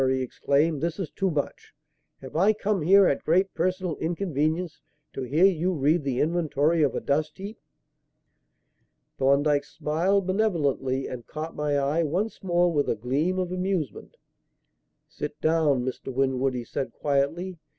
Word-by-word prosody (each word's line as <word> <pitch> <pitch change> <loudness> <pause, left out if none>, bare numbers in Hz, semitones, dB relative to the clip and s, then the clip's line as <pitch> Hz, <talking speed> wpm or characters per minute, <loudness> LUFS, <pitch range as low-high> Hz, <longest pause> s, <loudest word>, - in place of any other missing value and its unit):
he 130 0 +1
exclaimed, 140 +4 0
"this 170 0 -2
is 180 -7 -4
too 195 - -1
much! 150 -4 -4 0.5
Have 130 - -10
I 195 +6 +4
come 210 -3 -1
here, 195 +5 +6
at 140 - +1
great 185 +4 +2
personal 185 -2 -1
inconvenience, 165 -1 -2 0.3
to - - -5
hear 145 +8 +3
you 185 -1 +2
read 155 +1 +2
the 135 -3 -1
inventory 160 -1 +1
of 145 - +2
a - - 0
dust 155 +2 -1
heap?" 200 +3 -8 1.6
Thorndyke 145 +2 +3
smiled 165 +7 0
benevolently 150 -10 0
and 120 -2 -7
caught 155 +1 -6
my 150 -1 0
eye, 140 +4 +1
once 180 +8 -2
more, 175 -1 +2
with 145 -2 +1
a - - +1
gleam 140 - -1
of 180 -1 -2
amusement. 185 - -3 0.9
"Sit 150 0 -6
down, 155 -6 +2
Mr. 130 +1 -5
Winwood," 130 0 0
he 125 - -3
said 130 +3 -4
quietly. 160 +6 -1
155 Hz, 150 wpm, -26 LUFS, 140-180 Hz, 1.6 s, here